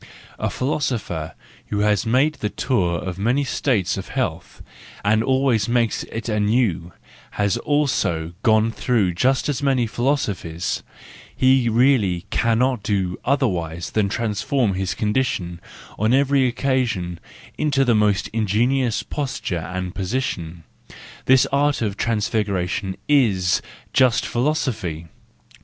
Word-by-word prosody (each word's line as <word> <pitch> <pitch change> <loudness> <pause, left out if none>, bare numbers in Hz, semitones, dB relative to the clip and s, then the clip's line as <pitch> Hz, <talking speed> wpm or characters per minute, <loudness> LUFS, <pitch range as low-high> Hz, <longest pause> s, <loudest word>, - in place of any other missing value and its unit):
A - - 0
philosopher 125 - -2 0.3
who 105 -1 -1
has 105 +1 +2
made 135 +7 +3
the 105 - -1
tour 95 -9 0
of 90 +2 -5
many 125 +7 +1
states 125 -7 0
of - - -6
health, - - -4 0.4
and 110 +2 +3
always 130 -5 +2
makes 120 -2 +1
it 115 0 -6
anew, 105 -5 +1 0.5
has 100 0 +2
also 120 - 0
gone 110 0 +3
through 110 -6 +1
just 130 +9 +1
as 145 -3 -1
many 135 -4 +2
philosophies: 105 - -1 0.5
he 130 -2 +3
really 115 -7 +2
cannot 120 +1 +1
do 95 -4 -1
otherwise 90 - -1
than 105 -2 +1
transform 110 +2 0
his 95 0 -2
condition 100 -6 -1 0.4
on 110 +4 +3
every 140 -1 +3
occasion 120 -9 -1 0.4
into 140 -3 +2
the 120 - +3
most 105 -2 +2
ingenious 115 +3 +1
posture 95 - -4
and 90 -1 -4
position,—this 95 - -2
art 140 -2 +2
of 100 -3 -2
transfiguration 105 -3 -1
is 100 -11 +3 0.3
just 125 -2 +3
philosophy. 115 - -2
110 Hz, 115 wpm, -22 LUFS, 95-130 Hz, 0.5 s, made